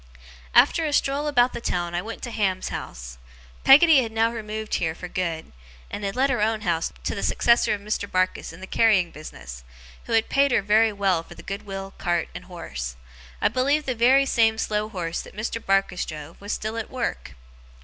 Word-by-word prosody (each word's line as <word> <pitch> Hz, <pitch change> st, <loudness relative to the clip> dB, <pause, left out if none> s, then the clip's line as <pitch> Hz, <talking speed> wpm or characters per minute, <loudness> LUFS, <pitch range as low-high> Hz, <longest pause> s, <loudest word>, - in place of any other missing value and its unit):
After 330 Hz, -, +5 dB
a 300 Hz, -2 st, -1 dB
stroll 285 Hz, +1 st, +1 dB
about 250 Hz, -4 st, +3 dB
the -, -, -5 dB
town 175 Hz, -5 st, -2 dB
I 175 Hz, -, -1 dB
went 225 Hz, +3 st, -8 dB
to 240 Hz, -, -4 dB
Ham's 190 Hz, -4 st, -1 dB
house. -, -, -7 dB, 0.4 s
Peggotty 295 Hz, +1 st, +8 dB
had 225 Hz, -3 st, -4 dB
now 225 Hz, +1 st, +2 dB
removed 215 Hz, -1 st, -5 dB
here 160 Hz, -2 st, 0 dB
for 180 Hz, -, -7 dB
good; 170 Hz, -3 st, -3 dB, 0.4 s
and 205 Hz, -, -5 dB
had 195 Hz, +1 st, -2 dB
let 265 Hz, +2 st, +2 dB
her 245 Hz, -5 st, 0 dB
own 220 Hz, 0 st, +1 dB
house 170 Hz, -5 st, -1 dB
to -, -, -2 dB
the -, -, -4 dB
successor 235 Hz, -2 st, +3 dB
of 200 Hz, -, -10 dB
Mr. 205 Hz, -1 st, -3 dB
Barkis 185 Hz, 0 st, 0 dB
in 165 Hz, +3 st, -13 dB
the -, -, -6 dB
carrying 190 Hz, -4 st, +3 dB
business, -, -, -10 dB, 0.4 s
who -, -, -4 dB
had 225 Hz, 0 st, +3 dB
paid 280 Hz, +1 st, +3 dB
her 205 Hz, -, +2 dB
very 215 Hz, +2 st, +4 dB
well 195 Hz, -4 st, +1 dB
for -, -, -14 dB
the -, -, -12 dB
good 200 Hz, +2 st, -6 dB
will, 195 Hz, 0 st, -6 dB
cart, 175 Hz, -2 st, 0 dB
and -, -, -8 dB
horse. 65 Hz, -, -6 dB, 0.5 s
I -, -, +4 dB
believe 280 Hz, +6 st, +1 dB
the 255 Hz, -, 0 dB
very 255 Hz, +4 st, +4 dB
same 225 Hz, -4 st, +3 dB
slow 215 Hz, -1 st, -1 dB
horse 170 Hz, -5 st, -3 dB
that -, -, -14 dB
Mr. 230 Hz, +1 st, -3 dB
Barkis 195 Hz, -2 st, +1 dB
drove 155 Hz, +2 st, -9 dB
was 205 Hz, +1 st, -5 dB
still 220 Hz, +2 st, -3 dB
at 225 Hz, -, -4 dB
work. 240 Hz, -, -4 dB
210 Hz, 210 wpm, -24 LUFS, 180-235 Hz, 0.5 s, Peggotty